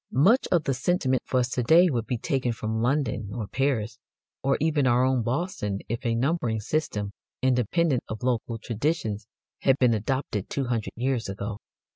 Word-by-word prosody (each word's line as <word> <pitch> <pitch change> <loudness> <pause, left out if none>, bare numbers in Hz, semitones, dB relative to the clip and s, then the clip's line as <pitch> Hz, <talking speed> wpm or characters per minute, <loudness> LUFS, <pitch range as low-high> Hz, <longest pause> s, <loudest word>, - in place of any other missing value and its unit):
Much 195 - +4
of 175 -3 +3
the 135 - 0
sentiment 130 -1 +1
for 130 - +2
us 125 - -1
to 125 - -1
day 165 +9 +6
would 120 -8 -1
be 125 - -1
taken 135 -1 -1
from 110 0 -2
London, 125 -4 0
or 115 -3 -3
Paris, 115 -3 -1 0.4
or 135 - +2
even 150 -3 +2
our 125 +1 +4
own 130 -1 +2
Boston, 120 - -2
if 115 +3 -3
a 115 -2 +1
numbering 125 -3 0
system, 105 -5 -2 0.3
independent 130 - +2
of 110 +2 -5
local 120 -2 0
traditions, 115 -2 -2 0.3
had 135 -1 +3
been 125 -3 +4
adopted 110 -2 -2
two 140 - -1
hundred 120 -3 -2
years 125 -3 -1
ago. 100 +2 -5
125 Hz, 175 wpm, -26 LUFS, 110-140 Hz, 0.4 s, day